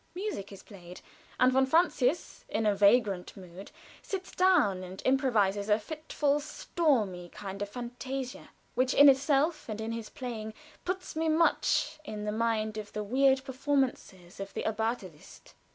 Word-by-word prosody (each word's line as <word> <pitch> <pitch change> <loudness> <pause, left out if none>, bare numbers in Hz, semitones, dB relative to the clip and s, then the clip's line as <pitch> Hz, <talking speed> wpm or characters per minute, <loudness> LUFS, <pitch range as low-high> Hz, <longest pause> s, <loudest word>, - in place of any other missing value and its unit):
Music 370 - -4
is 195 - -11
played, 180 -3 -12 0.4
and 255 0 +5
von 265 +1 +4
Francius, 320 -1 +1
in 220 +1 -1
a 210 - +4
vagrant 200 -3 +3
mood, 185 +1 -11 0.3
sits 380 -2 -5
down 315 - +3
and 185 +1 -9
improvises 215 -7 +2
a 210 - +5
fitful, 295 +3 -1
stormy 255 - -1
kind 195 +1 -8
of 205 - -3
fantasia, 250 +3 -6 0.2
which 255 0 +1
in 285 - +8
itself 280 +2 +3
and 215 0 -4
in 220 +1 -3
his 230 -1 -5
playing 225 -5 -6 0.3
puts 365 -1 -4
me 320 0 0
much 315 -1 +2
in 210 -5 -4
mind 220 -1 0
of 210 -1 -8
the 210 - -3
weird 265 +4 +3
performances 265 -10 -2
of 195 0 -6
the - - -2
Abbate 220 +1 -1
Liszt. 165 -5 -14
235 Hz, 150 wpm, -30 LUFS, 205-280 Hz, 0.4 s, in